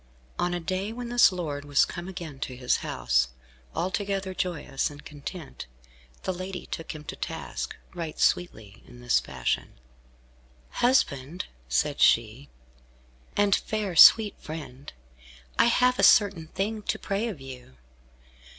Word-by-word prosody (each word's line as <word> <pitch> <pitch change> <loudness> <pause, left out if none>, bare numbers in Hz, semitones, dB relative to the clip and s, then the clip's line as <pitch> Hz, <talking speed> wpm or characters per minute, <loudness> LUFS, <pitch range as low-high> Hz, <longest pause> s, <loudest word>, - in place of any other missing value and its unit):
On 175 - +1
a - - -2
day 185 +4 -3
when 240 +1 -6
this 240 -3 +6
lord 155 -6 -4
was 145 -1 +3
come 175 +1 -7
again 170 -7 -7
to 130 -1 -4
his 125 0 +1
house, 60 0 +1 0.5
altogether 195 +1 -2
joyous 175 -7 -2
and 145 0 -13
content, 150 - -8 0.6
the 185 - -1
lady 185 +1 -6
took 165 0 -6
him 150 - -9
to - - -7
task, - - -5 0.2
right 165 -3 -6
sweetly, 110 - 0
in 120 0 -14
this 120 0 +2
fashion, - - -3 1.0
"Husband," 170 - +1 0.2
said 145 - 0
she, 115 +5 +3 0.9
"and 205 -1 +4
fair, 210 -4 -3
sweet 210 +6 +8
friend, 150 -4 -8 0.7
I - - +7
have 250 +1 +3
a - - +2
certain 195 -6 +5
thing 210 +6 -3
to - - -2
pray 200 +4 -2
of 200 -10 -6
you. 130 - -11
170 Hz, 140 wpm, -27 LUFS, 140-195 Hz, 1.0 s, sweet